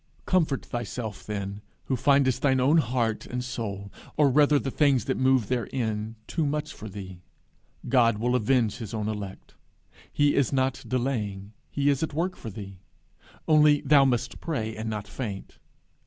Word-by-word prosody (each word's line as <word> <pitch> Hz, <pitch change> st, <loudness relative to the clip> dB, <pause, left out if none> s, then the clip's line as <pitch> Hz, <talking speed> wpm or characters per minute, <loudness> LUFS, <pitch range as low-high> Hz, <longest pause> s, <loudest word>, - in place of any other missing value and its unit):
Comfort 160 Hz, -7 st, +1 dB
thyself 115 Hz, -3 st, -5 dB
then, 100 Hz, -1 st, -4 dB, 0.2 s
who 130 Hz, -, -1 dB
findest 135 Hz, 0 st, +3 dB
thine 135 Hz, -2 st, +3 dB
own 145 Hz, +6 st, +4 dB
heart 115 Hz, -4 st, -1 dB
and 125 Hz, 0 st, -3 dB
soul, 100 Hz, -5 st, -5 dB, 0.3 s
or 145 Hz, -3 st, +5 dB
rather 145 Hz, +2 st, +5 dB
the 135 Hz, -1 st, -2 dB
things 140 Hz, -6 st, +3 dB
that 130 Hz, -, 0 dB
move 130 Hz, -4 st, +3 dB
therein, 115 Hz, -3 st, -2 dB
too 165 Hz, -, -1 dB
much 150 Hz, +1 st, -2 dB
for 110 Hz, -, -9 dB
thee: 95 Hz, -2 st, -9 dB, 0.7 s
God 115 Hz, -4 st, +4 dB
will 120 Hz, +3 st, 0 dB
avenge 120 Hz, -2 st, +2 dB
his 115 Hz, -3 st, -6 dB
own 105 Hz, -1 st, -2 dB
elect. 105 Hz, -3 st, -6 dB, 0.6 s
He 145 Hz, 0 st, +3 dB
is 140 Hz, -5 st, +2 dB
not 130 Hz, -1 st, 0 dB
delaying; 110 Hz, -6 st, -2 dB, 0.2 s
he 140 Hz, 0 st, -1 dB
is 140 Hz, -, -1 dB
at 160 Hz, -2 st, -2 dB
work 180 Hz, +4 st, -1 dB
for 115 Hz, -, -8 dB
thee. 100 Hz, -2 st, -9 dB, 0.7 s
Only 150 Hz, -2 st, +5 dB
thou 145 Hz, -2 st, +5 dB
must 125 Hz, -3 st, 0 dB
pray, 110 Hz, -9 st, -3 dB
and 110 Hz, +1 st, -4 dB
not 105 Hz, -1 st, -4 dB
faint. 100 Hz, -3 st, -6 dB
125 Hz, 165 wpm, -27 LUFS, 105-140 Hz, 0.7 s, or